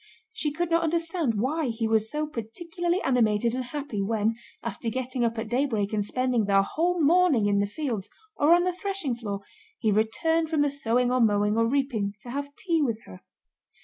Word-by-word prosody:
She 320 -10 -2
could 340 +3 -2
not 335 0 +4
understand 330 - 0
why 295 +6 0
he 225 -1 -1
was 220 0 +2
so 300 +4 -1
particularly 335 - -3
animated 235 -3 +2
and 255 0 -2
happy 275 -5 -4
when, 220 +2 +1 0.3
after 230 - -3
getting 255 +1 -2
up 230 0 0
at 220 0 -3
daybreak 225 -4 0
and 210 -1 +1
spending 250 0 0
the 195 -1 +4
whole 345 - 0
morning 320 - +4
in 200 0 +2
the 200 - +1
fields 225 -4 -3 0.3
or 295 +3 +3
on 350 - +2
the 365 0 0
threshing 385 -7 -3
floor, 205 -4 -4 0.4
he 215 - +1
returned 320 +10 +1
from 310 -2 +2
the 290 - +1
sowing 250 -3 +1
or 255 0 +2
mowing 210 -1 +3
or 230 0 +3
reaping 240 -6 0
to 240 - -8
have 285 +2 -5
tea 340 -7 0
with 230 -6 -1
her. 95 0 -12
250 Hz, 195 wpm, -26 LUFS, 220-315 Hz, 0.4 s, not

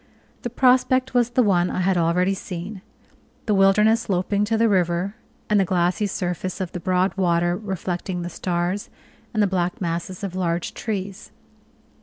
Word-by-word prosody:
The 240 - -3
prospect 255 +1 +3
was 245 -1 +3
the 245 +1 +3
one 180 -4 +2
I - - -2
had 190 +1 +2
already 175 +3 +2
seen 190 +1 -6 0.6
the 215 - +1
wilderness 210 +3 +4
sloping 200 +1 0
to 225 +1 0
the 230 +1 +4
river, 180 -1 +1 0.3
and 210 -1 +3
the - - +4
glassy 180 +3 +1
surface 180 0 -3
of 185 -2 -3
the 180 - -5
broad 185 +2 +1
water, 175 -1 +2
reflecting 185 -2 -4
the 175 - -4
stars, 175 +3 -2 0.4
and 215 -3 +2
the - - +4
black 180 -2 -1
masses 175 +2 -3
of 195 -3 -3
large 170 -2 -1
trees. 200 -2 -5
185 Hz, 165 wpm, -23 LUFS, 175-210 Hz, 0.6 s, wilderness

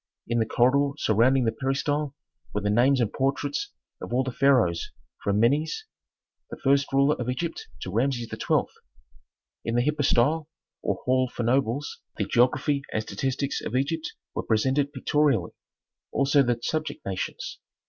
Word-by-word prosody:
In 120 0 +1
the 110 - +1
corridor 140 +4 +3
surrounding 125 +2 +3
the 115 - +2
peristyle 140 +3 -1 0.4
were 105 - 0
the 105 0 0
names 130 +5 +4
and 115 -4 0
portraits 140 - -1 0.3
of - - -7
all 125 +2 +2
the 130 - -3
pharaohs 120 -11 +2 0.3
from 100 0 +1
Menes 150 - +1 0.6
the - - -7
first 140 +1 +3
ruler 140 +2 +4
of 125 0 -3
Egypt 165 +6 -3
to 95 - -5
Rameses 120 +2 0
XII. - - +1 1.0
In 115 - -2
the 120 +1 +2
hypostyle, 150 +1 +2 0.3
or - - -2
hall 130 0 +2
for 120 - -4
nobles, 130 +3 0 0.2
the - - 0
geography 140 +4 +2
and 110 - -1
statistics 135 +7 -2
of 115 - -4
Egypt 155 +5 -1 0.2
were - - -2
presented 130 +6 +1
pictorially, 145 +1 +1 0.6
also 140 +1 +3
the 120 -3 +1
subject 155 0 -3
nations. 95 -1 -4
130 Hz, 150 wpm, -26 LUFS, 120-145 Hz, 1.0 s, names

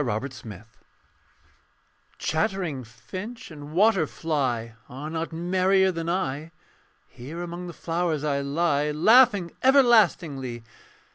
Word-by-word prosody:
THE 120 +2 -2
SKELETON 110 -4 -10 1.5
Chattering 170 -5 -1
finch 185 - -9
and 145 -1 -10
water 190 -1 +3
fly 130 -9 -2 0.2
Are 145 +5 -7
not 165 +1 -3
merrier 185 +3 +2
than 165 -1 -4
I; 155 -4 -2 0.6
Here 145 +8 -8
among 175 +1 -6
the 175 - -7
flowers 165 -3 -2
I 140 -2 0
lie 145 +1 0
Laughing 205 - +5
everlastingly. 175 - +3
165 Hz, 110 wpm, -25 LUFS, 140-185 Hz, 1.5 s, Laughing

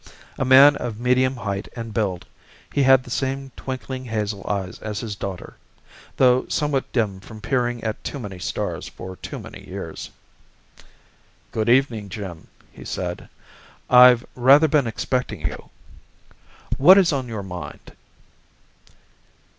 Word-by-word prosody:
A - - +1
man 135 +3 +8
of 115 -3 -5
medium 130 +2 +2
height 100 -4 -4
and 115 -2 -6
build, 95 -6 -2 0.5
he 145 - +2
had 135 -1 +5
the 125 - -12
same 135 +1 -2
twinkling 130 0 -6
hazel 105 -3 -3
eyes 95 -3 -3
as 105 -1 -5
his 110 -3 -5
daughter, 95 -2 -7 0.6
though 125 -1 +4
somewhat 145 -3 -1
dimmed 100 -6 -1
from 110 +2 -11
peering 120 0 -1
at 110 -1 -4
too - - -5
many 100 -8 -7
stars - - -4
for 95 0 -9
too - - -7
many - - -11
years. - - -7 1.4
"Good 110 0 -1
evening, 120 -5 +2
Jim," 95 -4 -8 0.2
he - - -13
said. - - -5 0.6
"I've 125 -1 +8
rather 135 +5 +6
been 145 -4 +2
expecting 115 - -2
you. 85 - -5 1.1
What 185 +8 +8
is 185 -5 +4
on 130 -3 -2
your 110 -4 -5
mind?" 90 -6 -9
120 Hz, 140 wpm, -22 LUFS, 105-130 Hz, 1.4 s, man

